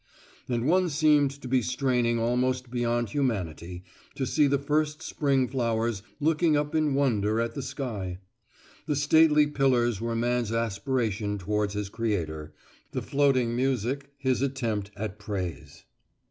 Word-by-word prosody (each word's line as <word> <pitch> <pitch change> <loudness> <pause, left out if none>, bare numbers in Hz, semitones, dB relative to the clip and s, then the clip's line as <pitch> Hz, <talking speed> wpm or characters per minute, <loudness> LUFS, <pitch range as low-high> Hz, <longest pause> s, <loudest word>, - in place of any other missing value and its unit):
And 120 -1 0
one 180 +4 +3
seemed 150 -1 +4
to - - -7
be 130 0 +2
straining 125 -1 +1
almost 125 +2 0
beyond 120 -2 0
humanity, 90 - -2 0.3
to 135 - -1
see 150 +3 +3
the 140 0 +2
first 150 +2 -1
spring 135 -5 +1
flowers 115 -4 -1 0.2
looking 155 0 +3
up 145 0 -1
in 155 -3 +2
wonder 110 -6 +1
at 115 0 -1
the 140 - -4
sky. 105 -9 -4 0.7
The 150 - +1
stately 150 +1 +5
pillars 125 -7 +1
were 115 0 -2
man's 120 -1 0
aspiration 110 -2 -1
towards 105 +1 -1
his 105 -1 -3
Creator, 80 -9 -3 0.4
the - - -2
floating 130 -4 +2
music 135 +2 -1
his 130 -2 0
attempt 115 -7 -1
at 105 0 -5
praise. 95 -7 -5
125 Hz, 140 wpm, -27 LUFS, 110-140 Hz, 0.7 s, stately